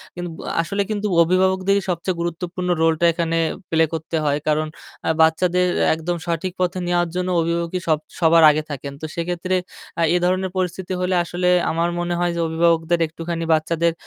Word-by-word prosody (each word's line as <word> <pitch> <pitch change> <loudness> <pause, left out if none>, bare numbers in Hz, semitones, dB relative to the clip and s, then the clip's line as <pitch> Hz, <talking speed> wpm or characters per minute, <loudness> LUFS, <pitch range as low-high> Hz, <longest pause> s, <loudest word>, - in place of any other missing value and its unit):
কিন্তু 175 0 -5
ব - - -15 0.2
আসলে 200 +4 -2
কিন্তু 210 -1 -1
অভিভাবকদেরই 190 +3 +2
সবচেয়ে 180 +1 -1
গুরুত্বপূর্ণ 175 +1 -3
রোলটা 165 +1 +3
এখানে 165 0 -1 0.3
প্লে 160 0 +3
করতে 160 +1 -3
হয় 145 0 +2
কারণ 155 0 +1 0.4
আ - - +2
বাচ্চাদের 175 +3 +3 0.3
একদম 170 +2 -3
সঠিক 170 +2 -2
পথে 185 +1 0
নেওয়ার 175 -1 +1
জন্য 180 0 -1
অভিভাবকই 170 +2 -1
সব 155 -2 +2 0.2
সবার 165 -1 +5
আগে 155 +1 +1
থাকেন। 140 0 -6
তো - - -4
সেক্ষেত্রে 175 +2 -2 0.4
আ - - +2
এ - - +4
ধরনের 185 +1 0
পরিস্থিতি 185 0 -2
হলে 185 0 +1
আসলে 175 +1 -2 0.2
আমার 165 +1 0
মনে 175 0 -1
হয় 175 -1 +1
যে - - 0
অভিভাবকদের 165 0 +2
একটুখানি 165 +1 -5
বাচ্চাদের 165 +1 +1
170 Hz, 170 wpm, -21 LUFS, 165-180 Hz, 0.4 s, সবার